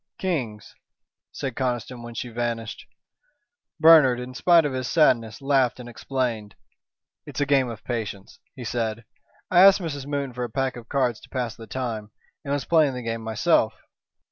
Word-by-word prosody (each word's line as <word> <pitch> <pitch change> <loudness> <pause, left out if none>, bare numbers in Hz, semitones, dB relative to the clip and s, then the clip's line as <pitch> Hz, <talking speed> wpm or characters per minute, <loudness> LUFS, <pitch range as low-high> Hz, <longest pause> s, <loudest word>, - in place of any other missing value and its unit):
"Kings," 125 - -3 0.6
said 135 -4 -5
Conniston, 125 -1 -3
when 120 0 -9
she 125 - -4
vanished. 115 -1 -4 0.9
Bernard, 155 -6 +7
in 125 +1 -7
spite 165 +4 +4
of 145 - -2
his 130 -1 -3
sadness, 120 -7 +2
laughed 135 -3 +2
and 125 - -9
explained. 120 -4 -3 0.7
"It's - - -6
a 145 - +2
game 135 -3 +2
of 110 -2 -8
patience," 105 -5 -5 0.2
he 125 - -8
said. 115 -1 -3 0.5
"I 175 - +5
asked 195 +1 +8
Mrs. 145 -6 -5
Moon 140 -3 -3
for 125 +1 -4
a 120 - -3
pack 135 +3 -1
of 120 -1 -11
cards 125 -5 0
to - - -17
pass 125 -4 -3
the 115 - -11
time, 115 -5 -4 0.3
and 140 - -5
was 145 -1 -1
playing 155 -5 +3
the 125 - -5
game 115 0 -3
myself. 110 -1 +1
125 Hz, 170 wpm, -24 LUFS, 115-140 Hz, 0.9 s, asked